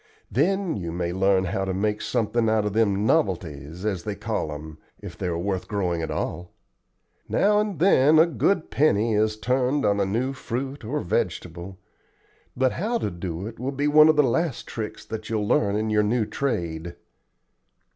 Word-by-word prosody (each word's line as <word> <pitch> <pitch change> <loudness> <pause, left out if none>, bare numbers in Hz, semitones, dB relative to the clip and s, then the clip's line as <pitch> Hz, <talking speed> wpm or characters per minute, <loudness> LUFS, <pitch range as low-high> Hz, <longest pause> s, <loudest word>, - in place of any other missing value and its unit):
Then 180 - +1
you 85 -4 -4
may 85 0 -2
learn 95 0 +3
how 95 +1 -2
to 95 -1 -2
make 105 +2 -1
something 115 +1 0
out 110 -1 +2
of 105 - -2
them 105 -2 +2
novelties, 85 - -1
as 95 -5 -1
they 105 +2 -4
call 105 -7 -3
'em, 75 +1 -8 0.2
if - - -9
they - - -4
are 85 -1 -1
worth 95 +1 -2
growing 90 -5 -1
at 80 - -3
all. 85 +2 -3 0.8
Now 210 +1 +3
and 210 -4 -1
then 155 -3 +5
a 160 - +7
good 170 +1 0
penny 115 -6 +2
is 110 0 +1
turned 130 +4 +1
on 100 0 +2
a 100 - +2
new 125 +7 -1
fruit 130 +1 -5
or 140 +7 -2
vegetable; 90 +1 -3 0.8
but 130 0 +3
how 225 +7 -1
to - - -2
do 85 +1 -5
it 110 0 -8
will 130 +3 -2
be 145 +1 -1
one 155 +1 +7
of 155 - +5
the 150 - +5
last 140 +2 0
tricks 110 -2 -6
that 110 -1 -6
you'll 110 -2 -1
learn 105 -3 +2
in 110 +1 -1
your 105 0 +3
new 110 +2 +1
trade. 85 -11 -3
110 Hz, 185 wpm, -25 LUFS, 95-135 Hz, 0.8 s, a